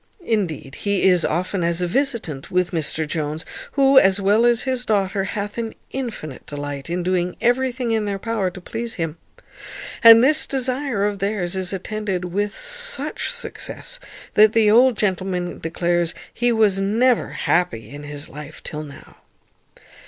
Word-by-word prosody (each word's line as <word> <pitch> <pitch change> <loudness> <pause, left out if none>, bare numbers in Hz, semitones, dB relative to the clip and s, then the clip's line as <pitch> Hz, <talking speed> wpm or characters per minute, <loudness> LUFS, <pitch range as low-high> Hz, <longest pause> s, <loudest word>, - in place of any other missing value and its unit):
Indeed, 165 -11 -2
he 200 -2 0
is 180 -2 +4
often 180 +3 -1
as 170 0 +1
a 180 - +1
visitant 215 - -1
with 180 -1 +1
Mr 160 -1 -1
Jones, 155 +1 -3 0.3
who, 275 -1 +6
as 195 -2 +3
well 205 +4 +4
as 235 -1 +3
his 255 -2 -1
daughter, 195 -3 0
hath 205 +2 -4
an 225 -1 -4 0.2
infinite 225 - -5
delight 145 0 -5
in 175 +1 -1
doing 180 0 0
everything 245 0 +1
in 220 -2 +1
their 200 -1 -2
power 215 -2 -1
to 180 - -10
please 225 +5 -5
him. 165 -1 -4 0.8
And 230 0 +10
this 305 +4 +3
desire 260 -4 -1
of 205 -1 -2
theirs 195 -3 -1
is 185 -1 -2
attended 195 -1 -3
with 200 +4 -2
such - - -2
success, - - -6 0.3
that 215 +1 +6
the 220 -2 +4
old 245 +1 +5
gentleman 185 -3 -1
declares 170 +1 0 0.2
he 240 +1 +1
was 215 -4 +3
never 230 +5 +2
happy 175 -11 0
in 145 +1 -8
his 145 0 -6
life 150 +2 -10
till 150 - -5
now. 145 -2 -12
195 Hz, 160 wpm, -21 LUFS, 175-235 Hz, 0.8 s, And